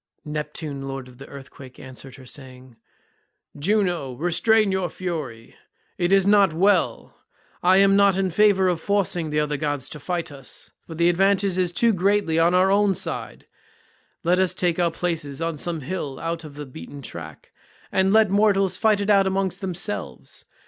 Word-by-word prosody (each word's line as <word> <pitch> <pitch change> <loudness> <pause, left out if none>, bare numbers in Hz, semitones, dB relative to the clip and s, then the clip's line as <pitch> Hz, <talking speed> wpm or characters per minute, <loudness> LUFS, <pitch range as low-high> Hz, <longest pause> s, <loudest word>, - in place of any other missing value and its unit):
Neptune 150 -1 -5
lord 135 -1 -6
of 125 0 -16
the 135 - -10
earthquake 135 -1 -12
answered 130 0 -10
her 135 -1 -14
saying, 130 -2 -10 0.8
"Juno, 175 -4 0
restrain 195 - +2
your 190 -2 -1
fury; 150 -11 -6 0.4
it 175 +1 +1
is 195 -1 +4
not 200 -4 +4
well; 195 +4 +1 0.4
I 185 +2 +5
am 195 0 +5
not 200 -1 +4
in 190 -1 0
favour 195 0 +4
of 175 -3 0
forcing 185 -5 0
the 150 0 0
other 150 -1 -1
gods 145 -2 -2
to 150 - -8
fight 175 +1 -3
us, 135 -2 -9 0.2
for 165 - -8
the 170 +1 +2
advantage 195 +2 +2
is 180 -2 +1
too 230 +5 +3
greatly 190 -3 +1
on 170 +2 +3
our 185 +1 +4
own 200 -1 +3
side; - - -5 0.8
let 180 +2 +2
us 185 -1 +2
take 175 -1 0
our 175 -1 +3
places 165 -4 -4
on 165 -1 -2
some 165 +1 -3
hill 145 -2 -5
out 165 0 -4
of 150 -2 -11
the 150 0 -7
beaten 135 - -10
track, 80 - -9 0.4
and 190 0 +2
let 215 -2 +4
mortals 195 -2 +2
fight 215 -2 +2
it 200 - -2
out 195 -1 +4
among 190 0 0
themselves. 165 - -6
175 Hz, 175 wpm, -23 LUFS, 145-195 Hz, 0.8 s, I